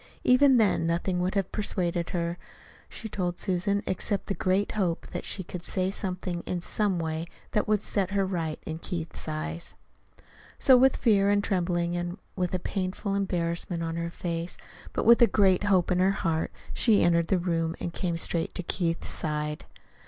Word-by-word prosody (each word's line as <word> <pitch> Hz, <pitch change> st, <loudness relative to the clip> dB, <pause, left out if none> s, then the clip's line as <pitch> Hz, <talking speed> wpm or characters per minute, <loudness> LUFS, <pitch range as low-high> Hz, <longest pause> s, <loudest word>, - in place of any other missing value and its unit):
Even 260 Hz, +1 st, +6 dB
then 205 Hz, -7 st, +3 dB
nothing 180 Hz, +2 st, 0 dB
would 185 Hz, +3 st, -1 dB
have 195 Hz, -2 st, 0 dB
persuaded 175 Hz, -4 st, -1 dB
her, 170 Hz, 0 st, -2 dB, 0.5 s
she 225 Hz, -, -6 dB
told 180 Hz, -4 st, -2 dB
Susan, 200 Hz, +2 st, 0 dB
except 200 Hz, +2 st, -1 dB
the 200 Hz, -, -1 dB
great 190 Hz, +1 st, +1 dB
hope 180 Hz, -6 st, -1 dB
that -, -, -4 dB
she 190 Hz, -, -3 dB
could 180 Hz, 0 st, -7 dB
say 185 Hz, +1 st, 0 dB
something, 180 Hz, -3 st, -3 dB
in 180 Hz, -, -1 dB
some 195 Hz, +2 st, 0 dB
way, 160 Hz, 0 st, -3 dB, 0.2 s
that 210 Hz, -, +1 dB
would 210 Hz, -1 st, +2 dB
set 195 Hz, -3 st, +1 dB
her 200 Hz, -1 st, +1 dB
right 165 Hz, -5 st, -2 dB
in 160 Hz, 0 st, -4 dB
Keith's 170 Hz, -2 st, -5 dB
eyes. 80 Hz, +2 st, -3 dB, 0.8 s
So 260 Hz, -, +6 dB
with 260 Hz, +1 st, +5 dB
fear 200 Hz, -4 st, +3 dB
and 205 Hz, 0 st, +3 dB
trembling 175 Hz, -2 st, 0 dB
and 175 Hz, +1 st, -3 dB, 0.2 s
with 180 Hz, -1 st, -1 dB
a -, -, +2 dB
painful 195 Hz, +2 st, -3 dB
embarrassment 175 Hz, -3 st, -1 dB
on 165 Hz, 0 st, -3 dB
her 170 Hz, 0 st, -2 dB
face, 170 Hz, 0 st, -4 dB, 0.3 s
but -, -, -2 dB
with 235 Hz, +2 st, +7 dB
a 235 Hz, -, +8 dB
great 195 Hz, -2 st, +3 dB
hope 190 Hz, -3 st, +3 dB
in 180 Hz, -, +2 dB
her 185 Hz, +1 st, +4 dB
heart, 165 Hz, -5 st, -1 dB, 0.2 s
she 220 Hz, -4 st, +4 dB
entered 170 Hz, -1 st, +3 dB
the 190 Hz, -, +2 dB
room 165 Hz, -2 st, -1 dB
and 170 Hz, -, -4 dB
came 170 Hz, -2 st, -1 dB
straight 165 Hz, 0 st, 0 dB
to 180 Hz, -, -2 dB
Keith's 170 Hz, -1 st, -1 dB
side. 150 Hz, -1 st, -3 dB
180 Hz, 180 wpm, -28 LUFS, 170-200 Hz, 0.8 s, a